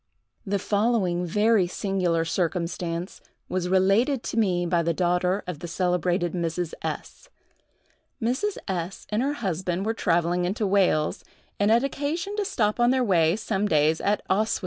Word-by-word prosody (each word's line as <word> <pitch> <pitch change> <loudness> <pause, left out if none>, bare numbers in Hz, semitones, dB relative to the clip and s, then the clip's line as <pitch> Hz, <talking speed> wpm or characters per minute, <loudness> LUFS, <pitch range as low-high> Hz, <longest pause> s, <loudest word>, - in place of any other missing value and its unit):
The 200 +1 +1
following 200 -4 0
very 210 +1 +3
singular 180 -3 0
circumstance 170 0 -2 0.3
was 180 -1 -2
related 200 +8 +3
to - - -4
me 180 -5 +1
by 170 0 +2
the 170 0 0
daughter 180 +2 +1
of 180 -5 -5
the 175 - -6
celebrated 175 0 0
Mrs. 170 -1 -2
S——: - - -6 0.9
Mrs. 260 - -1
S—— 180 -1 -4
and 210 +2 +1
her 280 +3 0
husband 185 - -2
were 225 - 0
travelling 175 -3 +1
into 200 +5 -1
Wales, 185 -6 +2 0.4
and 205 +1 +3
had 230 +3 +4
occasion 295 +8 -2
to 415 - 0
stop 225 - 0
on 240 0 +4
their 260 0 +2
way, 170 -6 +3
some 210 -1 -1
days, 155 -2 +2
at 205 +1 0
Oswestry. 215 +3 +1
190 Hz, 155 wpm, -25 LUFS, 175-220 Hz, 0.9 s, had